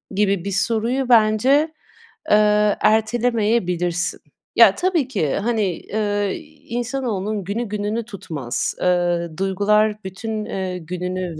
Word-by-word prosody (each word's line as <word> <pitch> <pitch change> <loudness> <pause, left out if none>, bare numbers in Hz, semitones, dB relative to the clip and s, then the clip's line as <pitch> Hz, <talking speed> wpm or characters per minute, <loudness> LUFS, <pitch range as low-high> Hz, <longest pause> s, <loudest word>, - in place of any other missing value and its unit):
gibi 200 -2 +1
bir 200 - -2
soruyu 235 +6 0
bence, 215 +1 +4 0.8
eee, 210 0 +4
ertelemeyebilirsin. 215 -6 +1 0.4
Ya, - - +7
tabii 350 -7 +1
ki, 175 - -1
hani, 210 -4 -1
ııı, 205 -2 0 0.4
insanoğlunun 230 -5 -2
günü 205 +6 -2
gününü 210 +2 -3
tutmaz. 155 - -4
Iıı, 175 -2 0
duygular 210 +2 +1
bütün, 215 +3 -5
eee, 185 -1 -4
gününü, 180 0 -4
210 Hz, 105 wpm, -21 LUFS, 185-220 Hz, 0.8 s, Ya